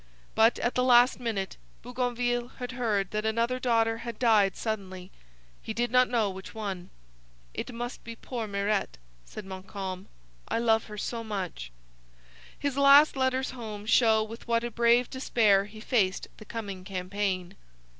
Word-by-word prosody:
But, 225 +2 +4
at 240 - -1
the 250 - +1
last 245 0 +5
minute, 215 -6 -3 0.3
Bougainville 245 0 -1
had 250 -1 -5
heard 215 -6 -1
that 215 0 -2
another 230 +3 0
daughter 225 -2 +1
had 235 -2 -6
died 215 -6 +3
suddenly; 190 -4 -5 0.5
he 220 - -6
did 240 0 0
not 250 0 +4
know 230 -3 +2
which 190 +3 -10
one. 195 -5 -5 0.6
'It - - -5
must 240 +1 -6
be 230 - -8
poor 230 -1 -5
Mirete,' 200 - -1 0.3
said 210 - -9
Montcalm, 190 0 -6 0.4
'I - - -1
love 225 -1 +2
her 210 -1 -9
so 230 +2 -4
much.' 185 - -5 0.9
His 280 -1 -2
last 280 +2 +7
letters 260 0 0
home 215 -5 -7
show 220 -1 +4
with 225 +2 -10
what 230 0 +1
a 240 - -3
brave 235 +2 +3
despair 215 -6 +2
he 215 +1 -12
faced 210 -5 0
the 215 - -12
coming 200 -5 -6
campaign. 185 0 -3
225 Hz, 155 wpm, -28 LUFS, 200-240 Hz, 0.9 s, last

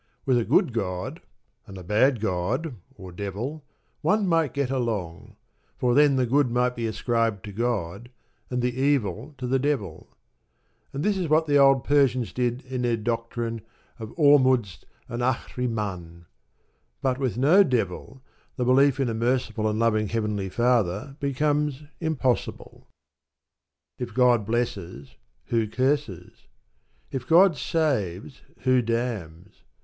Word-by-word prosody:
With 130 -3 +3
a - - 0
good 125 - +2
God, 90 -5 -4 0.5
and 100 - -10
a 90 - -9
bad 115 +7 +2
God 110 - -1 0.2
(or 95 -1 -10
Devil), 105 - -5 0.4
one 200 +6 +2
might 165 -5 +2
get 140 -2 -1
along; 110 -5 -3 0.4
for 125 -2 +1
then 145 +1 +5
the 130 -1 +2
good 135 +2 +2
might 125 +1 +1
be 115 -1 -2
ascribed 115 -2 -1
to 105 - -7
God, 110 -1 -3 0.4
and 125 -1 -2
the 125 0 -1
evil 135 - 0
to 130 - -5
the 130 +2 +1
Devil. 120 - -2 0.8
And 140 - -4
that 205 -2 +1
is 180 -3 -1
what 155 +1 +3
the 145 -2 +3
old 135 -2 +5
Persians 130 -4 +2
did 125 +1 -1
in 130 -1 -4
their 120 -2 +1
doctrine 115 0 -3 0.4
of 110 -1 -7
Ormuzd 130 - +3 0.2
and 120 +1 -5
Ahrimann. 105 -9 -3 0.8
But 130 -1 0
with 130 -4 -1
no 160 +10 +6
Devil 130 -1 -3 0.3
the 125 - -1
belief 135 +2 +4
in 135 - +1
a 115 - -1
merciful 115 -2 0
and 105 - -2
loving 110 -2 +1
Heavenly 105 -3 -2
Father 120 +2 0
becomes 145 +1 0 0.2
impossible. 150 -7 -2 1.1
If 120 -3 -6
God 120 -5 +3
blesses, 95 - -3 0.4
who 115 -2 +1
curses? 115 - -2 0.6
If 130 -2 -5
God 175 +1 +6
saves, 135 - -2 0.2
who 130 -1 +3
damns? 105 - -4
120 Hz, 140 wpm, -25 LUFS, 105-135 Hz, 1.1 s, no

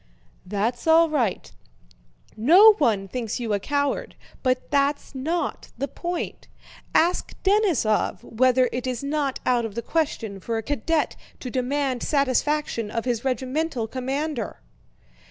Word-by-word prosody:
"That's 220 - -2
all 325 +1 +6
right. 240 -11 -1 0.8
No 355 - +8
one 210 -9 +2
thinks 235 +2 -3
you 230 -3 -2
a 200 - +1
coward, 285 - -1 0.3
but 255 -1 0
that's 285 0 +1
not 320 +6 -3
the 275 - -2
point. 345 +5 -5 0.5
Ask 350 +3 +2
Denísov 380 - +2
whether 255 +2 +3
it 250 +1 -3
is 250 0 -3
not 280 -2 -1
out 245 -2 +2
of 220 -3 -5
the 235 - -3
question 230 -11 -2
for 225 +4 -3
a 225 - -3
cadet 295 +4 0 0.3
to 250 - -5
demand 260 0 -1
satisfaction 280 -4 0
of 230 +2 -3
his 240 -3 -1
regimental 265 0 -1
commander?" 265 - -3
260 Hz, 135 wpm, -24 LUFS, 230-300 Hz, 0.8 s, No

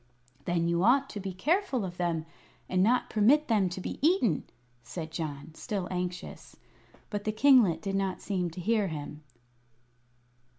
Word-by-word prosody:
"Then 170 -1 0
you 170 +1 +1
ought 270 +5 +3
to 205 - -5
be 195 -1 -4
careful 290 - 0
of 175 -1 -7
them, 170 -3 -1 0.4
and 185 0 +1
not 240 +6 +2
permit 265 +9 +4
them 205 -5 +2
to 175 - -6
be - - -5
eaten," 280 - +2 0.4
said 160 +6 -7
John, 155 -2 -5
still 190 +2 -4
anxious. 180 0 -5 0.6
But 205 -1 -3
the 215 - 0
kinglet 220 - +4
did 195 - -2
not 195 -1 -1
seem 180 -4 -2
to 165 - -9
hear 215 +1 +1
him. 150 -2 -6
190 Hz, 160 wpm, -29 LUFS, 170-225 Hz, 0.6 s, permit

